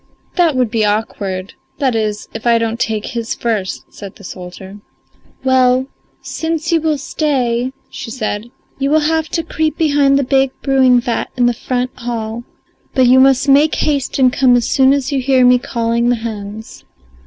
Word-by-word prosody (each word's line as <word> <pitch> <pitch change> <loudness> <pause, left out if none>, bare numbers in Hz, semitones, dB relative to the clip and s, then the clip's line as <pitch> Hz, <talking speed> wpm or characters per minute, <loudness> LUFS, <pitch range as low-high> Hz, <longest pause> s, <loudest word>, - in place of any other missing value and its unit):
"That 340 -5 +3
would 250 -4 +1
be 225 -2 +1
awkward 200 -3 -2 0.2
that 265 -5 0
is 215 -1 -2
if 225 +1 -5
I 235 -1 +5
don't 230 0 -2
take 220 -2 -1
his 235 -3 -4
first," 215 -6 -3
said 200 -2 -10
the 205 - -16
soldier. 185 +2 -9 0.6
"Well, 260 -1 +3 0.4
since 325 0 -3
you 330 -1 +2
will 310 -1 0
stay," 260 -4 -1 0.2
she - - -8
said, 220 -2 -4 0.3
"you 275 0 0
will 310 +1 +3
have 320 0 0
to 330 - -2
creep 315 -1 -2
behind 285 -3 +3
the 280 - +1
big 270 0 +1
brewing 260 -2 +4
vat 240 -1 -2
in 245 - +3
the 240 - +3
front 250 +2 -2
hall. 235 -1 -4 0.5
But 260 -2 +4
you 255 +1 +6
must 270 +1 +4
make 285 +3 +4
haste 285 -3 -1
and 255 -2 +3
come 255 -2 +4
as 240 -2 +1
soon 265 -1 +4
as 280 0 0
you 275 - 0
hear 260 -1 +3
me 250 0 +5
calling 235 0 -1
the 245 - +3
hens." 220 -1 -7
250 Hz, 180 wpm, -16 LUFS, 225-275 Hz, 0.6 s, you